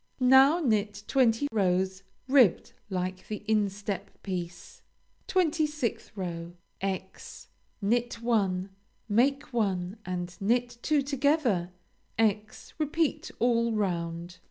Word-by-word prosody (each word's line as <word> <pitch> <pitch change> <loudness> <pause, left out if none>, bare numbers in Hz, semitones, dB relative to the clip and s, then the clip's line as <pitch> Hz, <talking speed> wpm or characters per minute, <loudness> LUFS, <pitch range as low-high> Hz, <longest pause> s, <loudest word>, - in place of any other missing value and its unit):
Now 265 +5 +6
knit 210 -6 0
twenty 255 +1 +2
rows 190 -2 +1 0.3
ribbed 255 -8 +4 0.2
like 185 0 -3
the 210 -1 -5
instep 200 -2 -1 0.2
piece. 175 -2 -6 0.5
26th 305 - 0
row 170 -3 -5 0.3
× 190 -1 -5 0.4
Knit 240 +4 +1
one; 200 -5 0 0.4
make 265 +6 +1
one 195 -3 -1
and 180 -1 -4
knit 240 +3 0
two 300 -2 +2
together; 275 - +1 0.5
× 215 -1 0
repeat 315 +1 0
all 235 -1 +2
round. 175 -3 -2
210 Hz, 100 wpm, -28 LUFS, 185-255 Hz, 0.5 s, Now